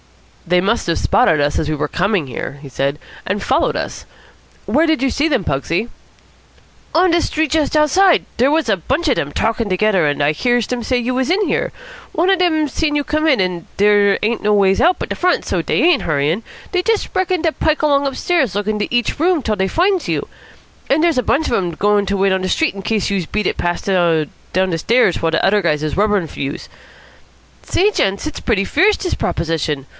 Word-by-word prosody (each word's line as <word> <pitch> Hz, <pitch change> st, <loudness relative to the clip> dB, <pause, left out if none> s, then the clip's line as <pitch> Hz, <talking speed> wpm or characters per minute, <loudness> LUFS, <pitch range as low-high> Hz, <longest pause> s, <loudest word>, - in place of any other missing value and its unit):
"They 180 Hz, +1 st, +3 dB
must 215 Hz, +3 st, 0 dB
have 170 Hz, -, 0 dB
spotted 155 Hz, -, +2 dB
us 145 Hz, 0 st, 0 dB
as 155 Hz, -, -2 dB
we 155 Hz, -, -1 dB
were 150 Hz, -, -2 dB
coming 195 Hz, -3 st, 0 dB
here," 135 Hz, +2 st, -6 dB
he -, -, -8 dB
said, 140 Hz, +2 st, -2 dB, 0.3 s
"and 200 Hz, +2 st, -2 dB
followed -, -, +1 dB
us. -, -, -5 dB, 0.6 s
Where 325 Hz, +2 st, +2 dB
did 315 Hz, -3 st, +1 dB
you 270 Hz, -, +1 dB
see 295 Hz, +3 st, +1 dB
them, 265 Hz, -6 st, +1 dB
Pugsy?" 165 Hz, -, -2 dB, 1.1 s
"On 355 Hz, +2 st, +4 dB
de 340 Hz, 0 st, +2 dB
Street 315 Hz, -2 st, -1 dB
just 310 Hz, -1 st, +1 dB
outside. 360 Hz, +5 st, +3 dB
Dere 255 Hz, +4 st, +2 dB
was 315 Hz, -2 st, +1 dB
a 215 Hz, -, +2 dB
bunch 270 Hz, -, -2 dB
of 270 Hz, -, +3 dB
dem 145 Hz, -, -3 dB
talkin' 225 Hz, +2 st, -1 dB
togedder, 185 Hz, -3 st, +2 dB
and 145 Hz, 0 st, -2 dB
I 145 Hz, -, +3 dB
hears 240 Hz, +8 st, 0 dB
dem 250 Hz, -1 st, -3 dB
say 250 Hz, +2 st, 0 dB
you 245 Hz, +1 st, -1 dB
was 260 Hz, +3 st, -1 dB
in 370 Hz, +3 st, +2 dB
here. -, -, -1 dB, 0.4 s
One 350 Hz, +4 st, +2 dB
of 380 Hz, -, +2 dB
dem 315 Hz, -4 st, +2 dB
seen 295 Hz, +2 st, -1 dB
you 290 Hz, -, +1 dB
come 310 Hz, +2 st, -1 dB
in, 270 Hz, -8 st, +3 dB
an 180 Hz, -2 st, -2 dB
dere 205 Hz, 0 st, +4 dB
ain't 225 Hz, +2 st, 0 dB
no 210 Hz, 0 st, +1 dB
ways 195 Hz, -1 st, +3 dB
out 360 Hz, +2 st, +3 dB
but -, -, -5 dB
de -, -, -3 dB
front, 360 Hz, 0 st, 0 dB
so -, -, -1 dB
dey -, -, 0 dB
ain't 340 Hz, -5 st, +4 dB
hurryin'! 155 Hz, +6 st, -1 dB, 0.3 s
Dey 365 Hz, -, +1 dB
just 445 Hz, +2 st, 0 dB
reckon 370 Hz, -2 st, 0 dB
to 325 Hz, -, +2 dB
pike 310 Hz, 0 st, -1 dB
along 285 Hz, -2 st, +2 dB
upstairs, 270 Hz, -, 0 dB
lookin' 210 Hz, +1 st, -1 dB
into 205 Hz, -, -3 dB
each 240 Hz, +2 st, 0 dB
room 335 Hz, -2 st, +2 dB
till 220 Hz, -2 st, 0 dB
dey 190 Hz, -1 st, 0 dB
finds 365 Hz, -, +1 dB
you. -, -, -2 dB, 0.6 s
An 275 Hz, -, +3 dB
dere's 330 Hz, -5 st, +2 dB
a -, -, -1 dB
bunch 305 Hz, +7 st, +1 dB
of -, -, -2 dB
dem 185 Hz, -6 st, 0 dB
goin' 205 Hz, +2 st, +1 dB
to 200 Hz, +1 st, -1 dB
wait 195 Hz, 0 st, +2 dB
on 190 Hz, -, -1 dB
de 185 Hz, -, -2 dB
Street 320 Hz, +9 st, +1 dB
in 195 Hz, -, -8 dB
case 210 Hz, 0 st, -1 dB
youse 190 Hz, -5 st, -2 dB
beat 210 Hz, -2 st, -1 dB
it -, -, -2 dB
past 175 Hz, 0 st, -2 dB
down 170 Hz, -5 st, +1 dB, 0.3 s
de 185 Hz, -2 st, +1 dB
stairs 230 Hz, 0 st, +2 dB
while 165 Hz, -, +1 dB
de -, -, +1 dB
udder 205 Hz, +1 st, +3 dB
guys 155 Hz, -4 st, 0 dB
is 155 Hz, -, -2 dB
rubberin' 205 Hz, -3 st, +1 dB
for -, -, -12 dB
youse. 140 Hz, +1 st, -4 dB, 0.9 s
Say, 410 Hz, +4 st, +1 dB
gents, 195 Hz, -, -1 dB
it's 310 Hz, -, -5 dB
pretty 205 Hz, -5 st, 0 dB
fierce, 410 Hz, -, +3 dB
dis 365 Hz, -, -3 dB
proposition. 155 Hz, -4 st, -2 dB
215 Hz, 230 wpm, -17 LUFS, -, 1.1 s, On